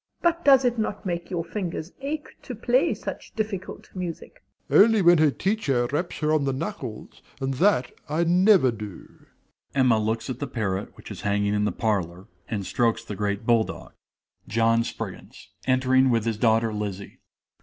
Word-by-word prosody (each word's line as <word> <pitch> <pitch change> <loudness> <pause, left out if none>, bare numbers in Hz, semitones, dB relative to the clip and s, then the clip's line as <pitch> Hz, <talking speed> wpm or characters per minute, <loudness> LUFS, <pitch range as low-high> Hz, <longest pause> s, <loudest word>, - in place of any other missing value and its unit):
But 340 0 +2
does 270 -2 +6
it 240 -1 +1
not 210 -1 -3
make 170 -2 -3
your 175 -3 -2
fingers 175 -2 -5
ache 295 +2 -4
to - - -7
play - - +2
such - - -8
difficult 205 -4 -4
music? 180 -3 -6 0.3
DOMINIE. - - +7
Only 225 -1 +3
when 175 -1 +6
her 155 -1 +5
teacher 145 - 0
raps 175 +5 -2
her 155 0 +2
on 155 -2 +2
the 135 - 0
knuckles, 130 - -6 0.2
and 135 0 -1
that 135 -3 +2 0.2
I 155 +3 +1
never 180 - +5
do. 105 -4 -10 0.5
(Emma 125 -5 +4
looks 110 +1 -1
at 130 -1 -5
the 145 - -3
parrot 105 -6 -3
which - - -11
is - - -7
hanging 100 0 0
in 105 0 +1
the - - +1
parlor, 95 -5 -2 0.2
and 100 -3 -3
strokes 115 +3 +1
the 105 - -6
great 100 +1 -2
bull 115 -1 +4
dog.) - - -9 0.5
JOHN 115 +1 +2
SPRIGGINS - - -8 0.2
(entering 130 0 +3
with 115 -2 +1
his 115 -2 -1
daughter 115 -1 +2
Lizzie). 100 -2 -5
130 Hz, 175 wpm, -25 LUFS, 110-180 Hz, 0.5 s, DOMINIE